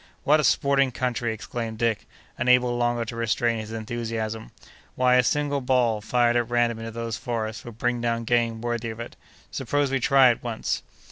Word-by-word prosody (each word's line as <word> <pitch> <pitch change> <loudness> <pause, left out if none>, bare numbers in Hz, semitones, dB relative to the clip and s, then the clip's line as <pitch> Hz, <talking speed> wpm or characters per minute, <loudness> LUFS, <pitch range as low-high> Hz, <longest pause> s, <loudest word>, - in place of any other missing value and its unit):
"What 150 +2 +4
a - - +1
sporting 140 -1 +3
country!" 125 -1 -1
exclaimed 110 0 -5
Dick, 115 -2 -1 0.3
unable 125 0 +3
longer 120 -1 0
to 115 - -7
restrain 115 0 0
his 110 0 -7
enthusiasm; 115 -1 -4 0.5
"why, 125 0 +3
a 125 - +6
single 145 +2 0
ball 125 -4 +2
fired 120 +2 +2
at 120 -1 +1
random 120 -1 +1
into 115 0 -5
those 115 -1 -4
forests 110 -1 -4
would 120 -2 -9
bring 120 0 -1
down 115 -1 -1
game 115 -1 +1
worthy 120 -1 -2
of 110 0 -7
it. 115 - -7 0.4
Suppose 145 -2 -1
we 135 - +1
try 130 0 +5
it 120 - -4
once!" 115 -2 -2
120 Hz, 185 wpm, -25 LUFS, 115-125 Hz, 0.5 s, a